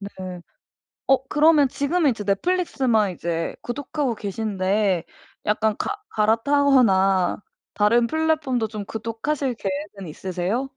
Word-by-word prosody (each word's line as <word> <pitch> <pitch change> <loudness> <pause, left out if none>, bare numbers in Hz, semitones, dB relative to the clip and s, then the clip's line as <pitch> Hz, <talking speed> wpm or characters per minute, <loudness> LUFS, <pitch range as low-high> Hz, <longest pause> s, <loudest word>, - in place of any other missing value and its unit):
네. 200 - -6 1.0
어 270 -1 +4
그러면 300 -1 +4
지금은 285 +3 +1
이제 215 -3 -5
넷플릭스만 235 - +1
이제 165 -1 -3
구독하고 270 0 -3
계신데 200 -3 -1 0.4
약간 215 0 +1
가 415 0 -3
갈아타거나 220 -5 +3 0.4
다른 235 +3 +3
플랫폼도 305 -7 0
좀 210 -2 -6
구독하실 235 +5 -3
계획은 195 -1 -5
있으세요? 185 - -3
225 Hz, 280 characters per minute, -23 LUFS, 200-280 Hz, 1.0 s, 어